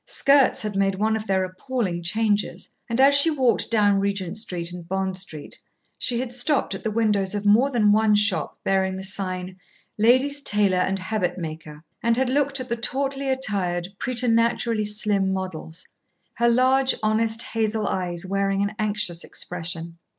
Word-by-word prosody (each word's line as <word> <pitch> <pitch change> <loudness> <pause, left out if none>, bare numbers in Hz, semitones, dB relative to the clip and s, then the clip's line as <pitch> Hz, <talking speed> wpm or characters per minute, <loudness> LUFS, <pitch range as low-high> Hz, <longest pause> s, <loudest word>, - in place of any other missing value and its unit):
Skirts 275 -4 +3
had 210 -2 -4
made 195 0 +1
one 215 +3 0
of 220 0 -5
their 190 -1 +1
appalling 185 -1 -3
changes, 210 +3 -1 0.2
and 230 +2 -1
as 275 +1 +6
she 280 +3 +6
walked 265 -6 +1
down 205 -3 +3
Regent 195 -2 -2
Street 180 -5 -4
and 175 -1 -10
Bond 190 0 -2
Street 160 -6 -4 0.4
she 240 -1 +1
had 250 -1 -4
stopped 255 -1 0
at 195 - -6
the 220 - -2
windows 210 -3 0
of 205 0 -4
more 225 +7 +4
than 220 -6 +3
one 215 0 +3
shop 205 -1 +1
bearing 190 -1 0
the 190 - -6
sign 185 -1 -5 0.4
"Ladies' 260 +6 +3
Tailor 205 -7 +3
and 190 +1 0
Habit 185 -2 -2
Maker," 155 -2 -8 0.2
and 230 0 +2
had 260 -1 +1
looked 280 0 +1
at 255 - -5
the 235 -1 -2
tautly 270 +3 -2
attired, 190 -9 0
preternaturally 230 -2 0
slim 205 -2 +1
models, 185 -4 -5 0.5
her 235 0 +2
large, 260 +2 +3
honest 220 +1 0
hazel 220 -1 -1
eyes 175 -1 -3
wearing 195 +1 0
an 200 - -1
anxious 205 -5 -1
expression. 170 -1 -4
210 Hz, 165 wpm, -23 LUFS, 185-235 Hz, 0.5 s, as